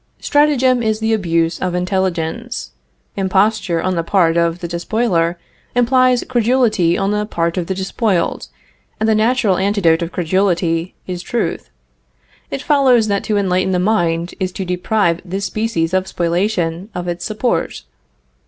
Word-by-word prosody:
Stratagem 265 Hz, -4 st, +3 dB
is 220 Hz, -1 st, 0 dB
the 220 Hz, 0 st, 0 dB
abuse 170 Hz, -5 st, 0 dB
of 180 Hz, -1 st, -2 dB
intelligence. 180 Hz, -, -2 dB, 0.4 s
Imposture 195 Hz, -2 st, +1 dB
on 185 Hz, -, 0 dB
the 170 Hz, -, 0 dB
part 170 Hz, -1 st, +2 dB
of 170 Hz, 0 st, +1 dB
the 175 Hz, -, -5 dB
despoiler 170 Hz, -1 st, 0 dB, 0.4 s
implies 255 Hz, 0 st, +3 dB
credulity 230 Hz, -8 st, +2 dB
on 195 Hz, +1 st, 0 dB
the 210 Hz, 0 st, -1 dB
part 170 Hz, -4 st, -1 dB
of 180 Hz, -3 st, -2 dB
the 190 Hz, -, -2 dB
despoiled, 190 Hz, -1 st, -1 dB, 0.5 s
and 220 Hz, -, +1 dB
the 220 Hz, -, +4 dB
natural 215 Hz, -3 st, +2 dB
antidote 190 Hz, -4 st, +2 dB
of 170 Hz, +1 st, -3 dB
credulity 175 Hz, -1 st, 0 dB
is 180 Hz, -1 st, -5 dB
truth. 235 Hz, +6 st, -3 dB, 0.8 s
It 275 Hz, -, -5 dB
follows 255 Hz, -7 st, +3 dB
that 200 Hz, -1 st, 0 dB
to 210 Hz, -, 0 dB
enlighten 185 Hz, -1 st, +1 dB
the -, -, +2 dB
mind 175 Hz, -3 st, 0 dB
is 185 Hz, -1 st, -1 dB
to 190 Hz, -, -4 dB
deprive 180 Hz, -1 st, 0 dB
this 195 Hz, +2 st, -4 dB
species 195 Hz, -7 st, -1 dB
of 185 Hz, 0 st, +1 dB
spoliation 175 Hz, +1 st, -1 dB
of 180 Hz, 0 st, -4 dB
its 175 Hz, 0 st, -3 dB
support. 220 Hz, +3 st, -2 dB
190 Hz, 150 wpm, -18 LUFS, 170-220 Hz, 0.8 s, the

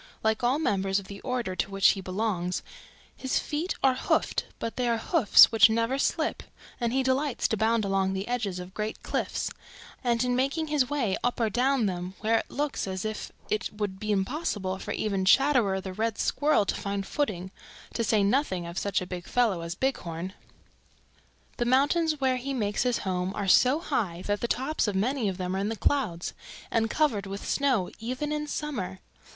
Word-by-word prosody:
Like 220 Hz, +1 st, +1 dB
all 250 Hz, +4 st, +3 dB
members 195 Hz, -10 st, +1 dB
of 200 Hz, -, -3 dB
the 200 Hz, 0 st, -8 dB
order 245 Hz, -7 st, -2 dB
to 195 Hz, -, -1 dB
which 195 Hz, -1 st, +4 dB
he 195 Hz, -, 0 dB
belongs 185 Hz, -2 st, -2 dB, 0.5 s
his 265 Hz, -, -1 dB
feet 315 Hz, +5 st, -2 dB
are 265 Hz, -1 st, +5 dB
hoofed, 255 Hz, -, 0 dB
but 230 Hz, -, -4 dB
they 250 Hz, -1 st, 0 dB
are 230 Hz, -, +2 dB
hoofs 255 Hz, -, +6 dB
which 225 Hz, 0 st, +7 dB
never 230 Hz, +4 st, 0 dB
slip, -, -, 0 dB, 0.4 s
and 235 Hz, -2 st, 0 dB
he 265 Hz, +2 st, +1 dB
delights 260 Hz, +1 st, +1 dB
to -, -, +1 dB
bound 220 Hz, 0 st, +2 dB
along 195 Hz, -1 st, +1 dB
the 190 Hz, +1 st, -3 dB
edges 230 Hz, -7 st, -2 dB
of 180 Hz, +1 st, -8 dB
great 215 Hz, +1 st, -4 dB
cliffs -, -, -2 dB, 0.5 s
and 240 Hz, -1 st, +2 dB
in 250 Hz, 0 st, +1 dB
making 275 Hz, +5 st, 0 dB
his 285 Hz, -4 st, +2 dB
way 250 Hz, -10 st, 0 dB
up 245 Hz, +1 st, 0 dB
or 225 Hz, -2 st, +1 dB
down 255 Hz, +1 st, +2 dB
them 180 Hz, -1 st, -3 dB
where 225 Hz, +1 st, +3 dB
it -, -, -7 dB
looks 290 Hz, -7 st, -2 dB
as 190 Hz, +1 st, -4 dB
if 215 Hz, 0 st, -4 dB, 0.2 s
it 215 Hz, -, -1 dB
would 205 Hz, -2 st, -4 dB
be 215 Hz, +1 st, -2 dB
impossible 195 Hz, -, -1 dB
for -, -, -8 dB
even 200 Hz, -3 st, -1 dB
Chatterer 235 Hz, -3 st, +4 dB
the 190 Hz, -1 st, -6 dB
Red 225 Hz, +2 st, -1 dB
Squirrel 295 Hz, -8 st, +2 dB
to -, -, 0 dB
find 200 Hz, -1 st, -3 dB
footing, 190 Hz, -11 st, -2 dB, 0.4 s
to 230 Hz, -, -1 dB
say 215 Hz, -2 st, +3 dB
nothing 200 Hz, -, +1 dB
of 170 Hz, +1 st, -4 dB
such 200 Hz, -1 st, 0 dB
a -, -, -4 dB
big 180 Hz, -1 st, -7 dB
fellow 225 Hz, -8 st, +2 dB
as 170 Hz, +1 st, -5 dB
Bighorn. 185 Hz, -8 st, -2 dB, 1.2 s
"The 240 Hz, -, 0 dB
mountains 290 Hz, +5 st, +2 dB
where 260 Hz, -1 st, +2 dB
he 270 Hz, +2 st, -3 dB
makes 210 Hz, -4 st, 0 dB
his 245 Hz, -1 st, +2 dB
home 185 Hz, 0 st, -1 dB
are 200 Hz, -1 st, -2 dB
so 255 Hz, +9 st, +5 dB
high 200 Hz, -, -2 dB
that 205 Hz, 0 st, -1 dB
the 235 Hz, -, 0 dB
tops 265 Hz, +2 st, 0 dB
of 205 Hz, -, -1 dB
many 230 Hz, +2 st, +1 dB
of 185 Hz, -, -4 dB
them 185 Hz, 0 st, -2 dB
are -, -, -1 dB
in 200 Hz, +2 st, -1 dB
the 225 Hz, -, -2 dB
clouds 215 Hz, -10 st, 0 dB, 0.4 s
and 225 Hz, -1 st, +1 dB
covered 225 Hz, -11 st, +1 dB
with 195 Hz, +1 st, -6 dB
snow 260 Hz, -10 st, +1 dB
even 255 Hz, +6 st, -3 dB
in 300 Hz, 0 st, -2 dB
summer. 250 Hz, -12 st, -4 dB
220 Hz, 200 wpm, -28 LUFS, 195-260 Hz, 1.2 s, which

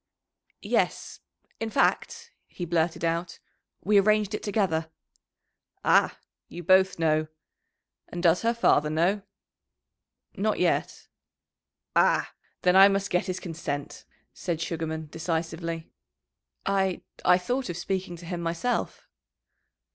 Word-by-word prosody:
"Yes. -, -, -1 dB, 0.4 s
In 225 Hz, -, -2 dB
fact," 470 Hz, -, 0 dB, 0.2 s
he 175 Hz, -, -6 dB
blurted 170 Hz, 0 st, 0 dB
out, 165 Hz, +1 st, -2 dB, 0.5 s
"we 205 Hz, +1 st, +5 dB
arranged 210 Hz, +1 st, +2 dB
it -, -, -3 dB
together." 185 Hz, -6 st, 0 dB, 1.0 s
"Ah! -, -, +4 dB, 0.3 s
You 175 Hz, -, -8 dB
both 190 Hz, +2 st, +4 dB
know. 155 Hz, -1 st, +1 dB, 0.8 s
And 175 Hz, 0 st, -6 dB
does 170 Hz, 0 st, +4 dB
her 230 Hz, +1 st, +1 dB
father 150 Hz, -9 st, +3 dB
know?" 175 Hz, +7 st, +1 dB, 1.1 s
"Not 210 Hz, +2 st, 0 dB
yet." 180 Hz, -2 st, 0 dB, 0.9 s
"Ah! -, -, +3 dB, 0.3 s
then 180 Hz, 0 st, +4 dB
I 195 Hz, +1 st, +9 dB
must 195 Hz, 0 st, -1 dB
get 180 Hz, +1 st, +1 dB
his 185 Hz, 0 st, -3 dB
consent," 160 Hz, -5 st, -5 dB, 0.3 s
said 170 Hz, -3 st, -3 dB
Sugarman 160 Hz, -1 st, -3 dB
decisively. 165 Hz, 0 st, -3 dB, 0.7 s
"I 190 Hz, -2 st, 0 dB, 0.2 s
I 180 Hz, -, +6 dB
thought 245 Hz, +6 st, -2 dB
of 175 Hz, -, -4 dB
speaking 185 Hz, 0 st, -3 dB
to 170 Hz, 0 st, -12 dB
him 175 Hz, 0 st, -4 dB
myself." 170 Hz, +9 st, -2 dB
175 Hz, 115 wpm, -27 LUFS, 165-195 Hz, 1.1 s, I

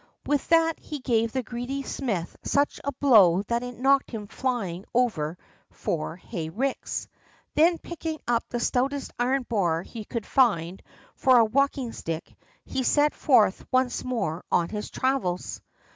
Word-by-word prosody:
With 290 Hz, -1 st, 0 dB
that 330 Hz, 0 st, +4 dB
he 300 Hz, -, -6 dB
gave 230 Hz, -4 st, +1 dB
the 260 Hz, +1 st, -2 dB
greedy 245 Hz, +4 st, -4 dB
smith 210 Hz, -12 st, -3 dB
such 285 Hz, +1 st, +1 dB
a 280 Hz, -, -1 dB
blow 210 Hz, -10 st, +5 dB
that 235 Hz, +3 st, -1 dB
it 245 Hz, -1 st, -7 dB
knocked 270 Hz, +2 st, +3 dB
him 220 Hz, -3 st, -5 dB
flying 200 Hz, -7 st, -3 dB
over 180 Hz, -10 st, +1 dB, 0.3 s
four 160 Hz, 0 st, -3 dB
hay 170 Hz, -3 st, -6 dB
ricks. 260 Hz, +10 st, -2 dB, 0.5 s
Then, 330 Hz, +3 st, +4 dB
picking 325 Hz, -2 st, -5 dB
up 235 Hz, -1 st, +2 dB
the 240 Hz, -, -2 dB
stoutest 270 Hz, +3 st, 0 dB
iron 255 Hz, +2 st, +1 dB
bar 175 Hz, -8 st, 0 dB
he 225 Hz, +1 st, -8 dB
could 230 Hz, -2 st, -4 dB
find 190 Hz, -9 st, +2 dB, 0.3 s
for 260 Hz, -1 st, +4 dB
a 230 Hz, -, +6 dB
walking 270 Hz, +1 st, +1 dB
stick, 165 Hz, 0 st, -5 dB, 0.3 s
he 265 Hz, -, -2 dB
set 290 Hz, +3 st, +3 dB
forth 220 Hz, -9 st, +3 dB
once 255 Hz, -1 st, +1 dB
more 180 Hz, -10 st, -2 dB
on 170 Hz, -1 st, +2 dB
his 210 Hz, -1 st, -5 dB
travels. 255 Hz, -10 st, -1 dB
245 Hz, 155 wpm, -26 LUFS, 195-270 Hz, 0.5 s, a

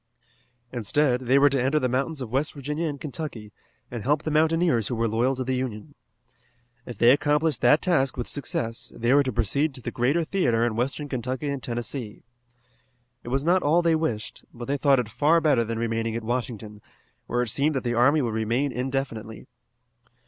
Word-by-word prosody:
Instead 125 Hz, +3 st, +1 dB
they 130 Hz, +3 st, +5 dB
were 140 Hz, +1 st, +6 dB
to 135 Hz, -2 st, +1 dB
enter 135 Hz, +4 st, +1 dB
the 130 Hz, -, +1 dB
mountains 135 Hz, +4 st, -1 dB
of 120 Hz, -4 st, -6 dB
West 135 Hz, +4 st, 0 dB
Virginia 150 Hz, +4 st, -3 dB
and 145 Hz, -2 st, -5 dB
Kentucky, 130 Hz, -7 st, -6 dB, 0.4 s
and 120 Hz, -2 st, -5 dB
help 145 Hz, +6 st, +1 dB
the 155 Hz, -, -2 dB
mountaineers 160 Hz, -, +2 dB
who 125 Hz, -, -2 dB
were 115 Hz, 0 st, 0 dB
loyal 120 Hz, +5 st, +1 dB
to 130 Hz, -, -3 dB
the 130 Hz, +1 st, -2 dB
Union. 130 Hz, +1 st, -4 dB, 0.9 s
If 120 Hz, -, -7 dB
they 120 Hz, +3 st, +6 dB
accomplished 150 Hz, +1 st, +1 dB
that 150 Hz, -, +4 dB
task 135 Hz, -8 st, +2 dB
with 120 Hz, -, -3 dB
success, 115 Hz, -4 st, -3 dB
they 120 Hz, +3 st, +1 dB
were 145 Hz, -, +6 dB
to 130 Hz, -2 st, -1 dB
proceed 135 Hz, +6 st, 0 dB
to 125 Hz, -, -11 dB
the -, -, -4 dB
greater 140 Hz, +8 st, +1 dB
theatre 125 Hz, -10 st, +1 dB
in 115 Hz, -2 st, -1 dB
Western 135 Hz, +5 st, -2 dB
Kentucky 130 Hz, +2 st, -3 dB
and 140 Hz, -2 st, -3 dB
Tennessee. 120 Hz, -1 st, -5 dB, 1.0 s
It -, -, -13 dB
was 135 Hz, +3 st, -1 dB
not 180 Hz, +2 st, +3 dB
all 165 Hz, +4 st, +3 dB
they 165 Hz, -1 st, +3 dB
wished, 155 Hz, -10 st, -2 dB
but 120 Hz, -1 st, -8 dB
they 140 Hz, -, -1 dB
thought 140 Hz, -1 st, +3 dB
it 120 Hz, -, -2 dB
far 150 Hz, +9 st, +3 dB
better 145 Hz, -7 st, +3 dB
than 115 Hz, 0 st, -4 dB
remaining 115 Hz, 0 st, -1 dB
at 115 Hz, -, -4 dB
Washington, 110 Hz, -3 st, -4 dB, 0.5 s
where 120 Hz, +1 st, 0 dB
it 120 Hz, -, -3 dB
seemed 145 Hz, +7 st, +1 dB
that 135 Hz, -, -1 dB
the 120 Hz, -1 st, -1 dB
army 140 Hz, +5 st, +4 dB
would 115 Hz, -3 st, -2 dB
remain 115 Hz, +6 st, 0 dB
indefinitely. 125 Hz, -4 st, -4 dB
130 Hz, 200 wpm, -25 LUFS, 115-145 Hz, 1.0 s, were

